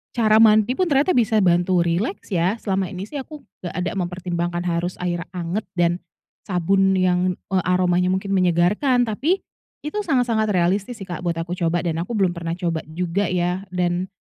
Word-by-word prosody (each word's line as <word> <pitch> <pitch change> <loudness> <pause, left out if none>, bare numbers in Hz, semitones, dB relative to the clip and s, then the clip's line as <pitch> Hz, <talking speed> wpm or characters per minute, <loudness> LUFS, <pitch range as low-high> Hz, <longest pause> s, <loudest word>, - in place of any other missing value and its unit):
cara 220 -2 +4
mandi 215 0 +5
pun 365 +6 0
ternyata 285 +4 +3
bisa 225 -4 +2
bantu 175 0 +3
rileks 185 - -2
ya. 180 +3 +1
Selama 195 -4 -1
ini 185 0 -6
sih 285 +8 -6
aku 295 +2 -9 0.2
nggak 175 -1 -6
ada 180 0 -1
mempertimbangkan 175 -1 -3
harus 175 0 -1
air 175 -1 -1
anget 180 +4 -3
dan 175 -1 +3 0.6
sabun 190 +1 +2
yang, 180 0 +2 0.2
eee, 185 -2 +2
aromanya 180 0 +2
mungkin 190 +2 -1
menyegarkan. 190 - +3
Tapi 265 - 0 0.4
itu 300 +7 -4
sangat-sangat 245 - +1
realistis 190 +5 0
sih, 195 - -8
Kak, 175 - -5
buat 170 -2 -1
aku 165 +1 -4
coba. 170 -1 0
Dan 165 -2 -1
aku 205 +7 -4
belum 190 -4 +2
pernah 170 -1 -4
coba 170 -2 -2
juga 180 +4 -1
ya. 180 +2 -1
Dan 180 0 -1
185 Hz, 175 wpm, -22 LUFS, 175-215 Hz, 0.6 s, mandi